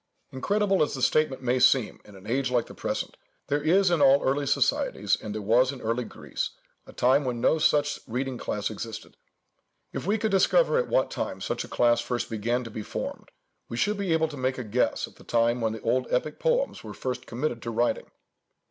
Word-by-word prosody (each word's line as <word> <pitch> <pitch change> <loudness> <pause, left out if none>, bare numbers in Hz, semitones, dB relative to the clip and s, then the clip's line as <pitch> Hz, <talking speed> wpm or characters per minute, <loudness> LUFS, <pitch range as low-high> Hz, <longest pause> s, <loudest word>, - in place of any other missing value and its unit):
Incredible 200 +8 +1
as 150 - +1
the 130 - -5
statement 140 -4 +2
may 125 +1 +1
seem 125 -2 +3
in 105 - -14
an 95 +1 -14
age 130 +4 0
like 120 -2 +1
the - - -12
present, - - -4 0.3
there 145 +1 +1
is 180 +4 +3
in 170 -4 +2
all 140 0 +6
early 140 +2 +1
societies, - - +1
and 105 0 -5
there 110 - -4
was 120 +5 +4
in 135 - -8
early 115 +1 -1
Greece, - - -4 0.4
a - - -11
time 130 +4 +3
when 125 -3 -2
no 160 +6 +3
such 145 -1 +2
reading 130 +2 -3
class 105 +1 -2
existed. 110 +1 -7 0.8
If - - -4
we 210 +2 +2
could 220 -1 -1
discover 485 - +4
at 485 - -1
what - - +2
time - - -3
such - - -3
a - - -9
class 120 -1 +3
first 120 0 -3
began 120 +3 -1
to 115 - -8
be 110 - -5
formed, - - -6 0.4
we 115 - -5
should 210 +11 +1
be 200 -3 -2
able 160 0 +3
to 145 - -8
make 130 0 -1
a 125 - -4
guess 115 +3 0
at - - -19
the - - -15
time 120 +1 +1
when 110 -1 0
the 110 - -7
old 125 +2 +1
epic 150 +5 -1
poems - - 0
were - - -8
first 125 -1 -4
committed 120 0 -3
to 115 - -5
writing. 120 +1 0
130 Hz, 220 wpm, -27 LUFS, 120-155 Hz, 0.8 s, all